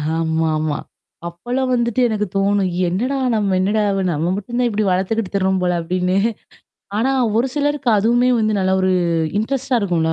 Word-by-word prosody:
ஆமாமா. 160 -2 0 0.5
அப்பலாம் 245 +10 -3
வந்துட்டு 235 0 +1
எனக்கு 210 -1 -1
தோணும். 195 -1 +1 0.2
என்னடா 240 +11 -1 0.2
நம்ம 200 -3 +1
என்னடா 205 +3 +1 0.3
நம்ம 165 +3 -1
மட்டும் 210 +4 -5
தான் 245 - +2
இப்டி 215 -1 -1
வளத்துக்கிட்டு 190 +3 -1
திருறோம் 190 -1 +1
போல 180 0 +1
அப்டின்னு. 180 +2 0 0.8
ஆனா 260 +5 +1 0.3
ஒரு 250 +3 +1
சிலருக்கு 290 -3 0
அதுவுமே 240 +4 +2
வந்து 215 -2 +1
நல்ல 190 0 +1
ஒரு 185 0 +2 0.5
இன்ட்ரெஸ்ட்டா 255 +3 0
இருக்கும்ல. 170 -5 0
200 Hz, 150 wpm, -19 LUFS, 180-240 Hz, 0.8 s, தான்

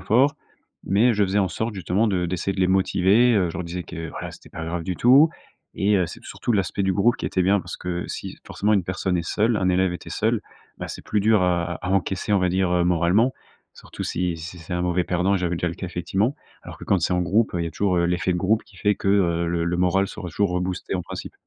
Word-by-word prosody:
fort», 135 +6 +3 0.5
mais 115 +5 +3
je 105 -1 +1
faisais 100 +1 +1
en 95 -2 +2
sorte 110 +3 -3
justement 95 +4 0
de 90 -3 0
d'essayer 90 +2 -2
de 95 - -3
les 90 - +4
motiver, 95 +5 +3
heu. 90 -4 +2
Je - - -11
leur 90 - -3
disais 90 +1 -5
que, 80 -1 -7
voilà - - -6
c'était - - -14
pas 80 - -7
grave 85 +1 -3
du 90 - -3
tout, 135 +6 +6 0.5
et 100 +1 +2
heu, 90 -2 +1
c'est - - -10
surtout 120 - -3
l'aspect 100 -1 0
du 95 0 +1
groupe 120 +5 +3
qui - - -4
était 95 - 0
bien, 100 +2 +3
parce - - -7
que 90 -1 -4
si - - -6
forcément, 105 +2 0
une 95 -4 +2
personne 95 0 -1
est - - -1
seule 110 +1 +1
un 95 - +1
élève 90 0 +2
était 90 - -8
seul, - - 0 0.4
bah, - - -5
c'est - - -7
plus 105 - 0
dur 105 -2 +3
à 85 -1 +1
à - - -8
à - - -1
encaisser, 95 +1 0
on 100 - +4
va 90 -1 +1
dire, 95 0 +1
moralement, 90 +8 +3 0.4
surtout, - - -9
si 90 -1 -1
si 85 +2 -8
c'est 80 +1 -9
un 90 - -1
mauvais 90 0 +1
perdant. 90 +3 +1
J'avais 90 -1 -1
déjà 90 - -2
eu - - -3
le - - -8
cas 95 - -5
effectivement. 95 - -1 0.3
Alors - - -10
que - - -9
quand 100 - +2
c'est 85 - 0
en 90 - +1
groupe, 105 +3 +1
heu, 85 - 0
il - - -1
y - - -2
a - - -9
toujours 95 -1 0
l'effet 90 +1 +1
de - - -1
groupe 105 +5 +1
qui - - -20
fait 105 -1 +2
que, 95 - -3
heu, 85 -4 +2
le 85 0 0
le 85 +1 -1
moral 95 +2 +2
sera 95 -4 -7
toujours 100 +3 0
reboosté, 90 +1 -2
en 90 - -1
principe. - - -7
95 Hz, 270 wpm, -23 LUFS, 90-100 Hz, 0.5 s, tout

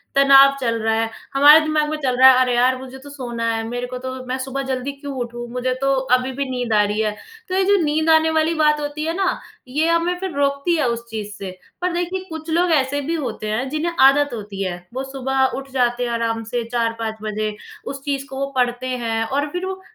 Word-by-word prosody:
तनाव 275 0 +7
चल 230 -2 0
रहा 220 0 +1
है, 225 - -1 0.2
हमारे 290 +3 +8
दिमाग 310 -1 0
में 310 - -2
चल 255 -2 0
रहा 260 +1 +9
है 255 - +4
अरे! 250 -1 +2
यार 255 +2 +3
मुझे 260 0 -10
तो 285 +2 -12
सोना 245 -5 -5
है, 225 - -2
मेरे 245 +1 -4
को 250 0 -6
तो 260 +1 -5
मैं 255 +1 -3
सुबह 265 +1 -4
जल्दी 260 +1 -2
क्यों 280 0 -8
उठूँ? 240 -1 -5
मुझे 250 +1 -1
तो 275 0 +2 0.2
अभी 255 +1 -2
भी 280 - -1
नींद 245 -3 -2
आ 210 - +5
रही 205 +1 -1
है। 215 -1 0 0.4
तो 370 - -1
ये 385 - +3
जो 405 +1 +4
नींद 310 +1 +1
आने 320 0 +5
वाली 320 +1 +2
बात 300 -1 +2
होती 295 +1 -4
है 325 - -1
ना, 385 -2 0 0.3
ये 300 +6 0
हमें 335 +2 +1
फिर 380 0 -4
रोकती 280 +4 +1
है 300 -5 +1
उस 235 0 -3
चीज़ 215 -2 -5
से। 195 -2 -6 0.3
पर 360 0 0
देखिए 355 +2 -2
कुछ 320 0 -7
लोग 345 +2 +2
ऐसे 285 -1 +1
भी 320 +4 -2
होते 240 -8 -4
हैं 230 +5 -1
जिन्हें 310 +4 -2
आदत 275 +1 +5
होती 205 -3 -5
है, 180 -2 -3 0.2
वो 260 +1 -3
सुबह 265 0 0
उठ 275 0 -7
जाते 245 -1 +1
हैं 245 - -2
आराम 230 -1 -1
से 235 +2 -3
4-5 230 -2 -1
बजे, 215 0 -3 0.3
उस 275 0 -6
चीज़ 275 -1 -2
को 265 - -7
वो 275 0 -2
पढ़ते 245 0 0
हैं 230 -3 -1
और 285 +5 -1
फिर 360 +3 -3
वो 380 0 -5
265 Hz, 240 wpm, -21 LUFS, 240-300 Hz, 0.4 s, रहा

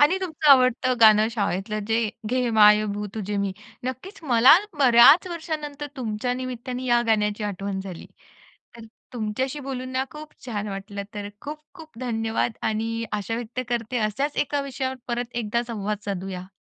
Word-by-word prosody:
आणि 305 +6 +5
तुमचं 315 -5 +1
आवडत 255 -1 +5
गाणं 215 0 +7
शाळेतल 205 -1 -2
जे 225 +1 +1 0.3
"घे 250 -1 +1
माय 210 0 +7
भू 210 0 -4
तुझे 210 -1 -3
मी." 195 - -2 0.3
नक्कीच 260 - -6
मला 255 +1 +7 0.2
बऱ्याच 265 +6 +7
वर्षानंतर 305 -3 -5
तुमच्या 235 -1 -2
निमित्ताने 255 0 -5
या 240 -1 +3
गाण्याची 210 -1 +1
आठवण 200 -1 -3
झाली. 190 -3 -8 0.7
तर 230 - -11 0.3
तुमच्याशी 250 +5 -3
बोलून 255 -1 -4
ना 260 +1 0
खूप 300 0 -10
छान 210 -3 -3
वाटलं 200 0 -6
तर 205 -1 -5
खूप-खूप 305 - -10
धन्यवाद 225 -1 -1 0.2
आणि 225 +1 -2
आशा 210 +1 -2
व्यक्त 240 +1 -4
करते 240 0 -2
अशाच 225 +7 -1
एका 285 0 0
विषयावर 265 -1 -3
परत 240 0 -3
एकदा 225 +3 -1
संवाद 210 -3 -3
साधूया. 190 -2 -5
235 Hz, 150 wpm, -24 LUFS, 210-265 Hz, 0.7 s, गाणं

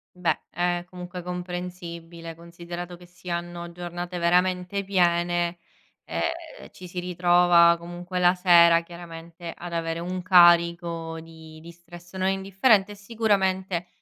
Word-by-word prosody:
Beh, 175 -3 0
è 175 +1 -1
comunque 180 0 -8
comprensibile, 175 -2 -7
considerato 170 +1 -8
che 175 - -15
si 175 +1 -13
hanno 170 0 -5
giornate 175 +1 -6
veramente 180 +3 +1
piene, 175 -2 +1 0.4
e 335 -1 -5
ci 180 - -11
si 180 +1 -6
ritrova 175 -1 +4
comunque 175 +2 -7
la 180 0 +5
sera, 170 -2 +6
chiaramente, 170 0 -10
ad 175 -1 -8
avere 165 0 -2
un 180 +1 -4
carico 170 -2 +4
di 160 -1 -13
di 170 +1 -11
stress 175 +1 -15
non 190 0 0
indifferente 195 +2 +2
e - - -12
sicuramente 190 -4 -1
175 Hz, 130 wpm, -25 LUFS, 170-180 Hz, 0.4 s, sera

